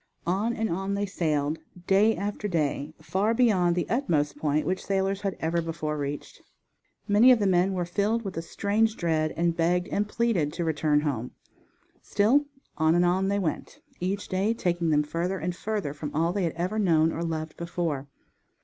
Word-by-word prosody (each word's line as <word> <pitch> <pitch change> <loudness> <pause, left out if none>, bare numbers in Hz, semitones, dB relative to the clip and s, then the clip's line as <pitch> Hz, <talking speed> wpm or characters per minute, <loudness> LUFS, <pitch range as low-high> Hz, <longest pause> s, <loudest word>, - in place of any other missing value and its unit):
On 195 +7 +1
and 225 0 -1
on 195 +3 -2
they 200 +1 0
sailed, 155 -5 -1 0.3
day 205 +4 +4
after 205 +3 -3
day 155 -4 -1
far 210 +4 0
beyond 190 -8 +3
the 175 - -1
utmost 160 - 0
point 150 0 0
which 185 +4 -1
sailors 195 0 0
had 195 -2 -2
ever 165 +1 0
before 160 -2 -3
reached. 145 0 -5 0.7
Many 220 +5 +6
of 250 - +6
the 210 - 0
men 185 0 +3
were 180 -2 -1
filled 210 +6 0
with 190 - -5
a 165 - -2
strange 210 +6 0
dread 155 -2 0
and 170 0 +1
begged 175 +2 +1
and 210 +1 -1
pleaded 205 -12 0
to 170 - -2
return 150 -2 +2
home. 125 -5 -3 0.7
Still 255 +9 +3 0.3
on 160 +1 +4
and 175 0 +4
on 185 +2 +2
they 200 +1 +1
went, 180 -6 -3 0.2
each 190 +3 -2
day 200 +4 0
taking 175 -5 0
them 150 -1 +3
further 170 +5 -2
and 175 +1 -3
further 205 -8 -3
from 150 0 -5
all 165 +3 +1
they 195 -2 0
had 165 - -1
ever 180 +6 -2
known 165 -5 +3
or 165 - -4
loved 160 -1 -3
before. 170 -5 -3
175 Hz, 185 wpm, -27 LUFS, 160-200 Hz, 0.7 s, Many